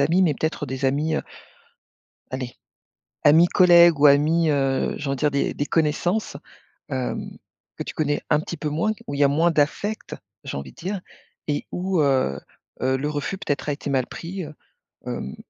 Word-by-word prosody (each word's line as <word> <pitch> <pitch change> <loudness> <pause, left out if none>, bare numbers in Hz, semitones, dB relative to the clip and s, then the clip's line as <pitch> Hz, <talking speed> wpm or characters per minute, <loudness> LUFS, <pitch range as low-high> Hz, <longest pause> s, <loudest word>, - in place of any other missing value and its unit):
amis, 170 +7 +3
mais 155 -5 +3
peut-être 155 0 -2
des 130 +1 -4
amis, 150 +4 +1
heu - - -1 1.1
allez 130 -2 -5 0.7
amis 160 +4 +7
collègues 170 -4 +6
ou 150 - +5
amis, 155 +3 +4
heu, 135 -2 +1
j'ai 145 - -5
envie 135 - 0
de - - -9
dire 150 -1 +3
des 140 - 0
des 145 - -2
connaissances, 165 +5 0 0.5
hem, 130 -3 -4 0.4
que - - -3
tu - - -7
connais 145 -2 0
un 150 - +5
petit 170 +1 -6
peu 150 - -3
moins, 165 +9 0 0.2
où 140 - -3
il 140 - -3
y - - +6
a - - +5
moins 160 +5 +3
d'affects 165 +8 -1 0.3
j'ai - - -5
envie 70 -2 -7
dire, 190 +2 -4 0.5
et 145 - -1
où, 185 -1 0
heu 130 - +2 0.4
heu, 130 0 +2
le 145 +3 -2
refus 150 +6 -3
peut-être 150 -7 -3
a - - +2
été 140 0 -5
mal 130 -2 +1
pris, 180 +1 -6
heu, 155 - -10 0.5
hem. 65 - -5
150 Hz, 190 wpm, -23 LUFS, 140-170 Hz, 1.1 s, amis